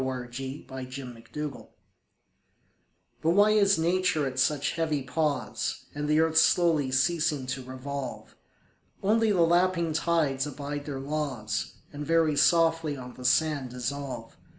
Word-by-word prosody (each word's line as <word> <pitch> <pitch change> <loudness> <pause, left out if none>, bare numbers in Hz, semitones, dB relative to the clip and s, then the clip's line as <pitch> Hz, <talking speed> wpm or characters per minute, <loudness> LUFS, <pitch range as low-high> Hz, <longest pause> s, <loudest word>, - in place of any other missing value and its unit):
Michael 125 -2 -4
Field 135 +3 -6
September 130 +2 -7 1.5
BUT 160 - +1
why 205 +3 +5
is 200 -3 +4
Nature 170 -2 +1
at 130 -1 -3
such 145 +1 +2
heavy 155 -4 -1
pause, 145 +2 -2
And 145 0 -3
the 150 +1 +3
earth 160 0 +4
slowly 160 -7 +3
ceasing 150 0 +1
to 130 +1 -4
revolve? 130 +1 -6 0.7
Only 220 +2 +3
the 185 -4 +2
lapping 170 -1 +2
tides 150 -4 +1
abide 145 +1 -5
their 140 -3 -4
laws, 135 -7 -3 0.2
And 145 +1 -5
very 160 -1 +2
softly 165 -2 +3
on 125 -1 -9
the 125 - -11
sand 140 +1 +2
dissolve. 125 -1 -5
145 Hz, 130 wpm, -28 LUFS, 130-165 Hz, 1.5 s, why